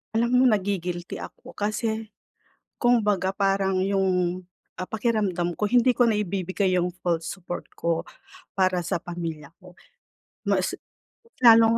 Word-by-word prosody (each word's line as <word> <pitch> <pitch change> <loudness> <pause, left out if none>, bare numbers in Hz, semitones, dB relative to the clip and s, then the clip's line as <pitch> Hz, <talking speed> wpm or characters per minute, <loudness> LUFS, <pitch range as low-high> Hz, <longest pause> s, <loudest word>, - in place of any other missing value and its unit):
Alam 235 +1 +2
mo, 260 - +5
nagi-guilty 185 -5 0
ako - - -10
kasi 220 +1 -1 0.7
kung 245 -1 +3
baga 190 -2 +2
parang 195 -1 +1
yung, 185 -2 +1 0.3
ah, 185 - -6
pakiramdam 205 -6 0
ko 210 +2 -1
hindi 245 +1 +4
ko 245 - +3
naibibigay 190 -2 0
yung 180 0 +1
full 170 -2 0
support 175 0 -6
ko 165 -1 0 0.5
para 185 -2 +1
sa 170 - -1
pamilya 165 -4 -6
ko. 180 -1 -15 0.7
Mas - - +1 0.6
lalo 230 -1 +7
190 Hz, 125 wpm, -25 LUFS, 175-215 Hz, 0.7 s, lalo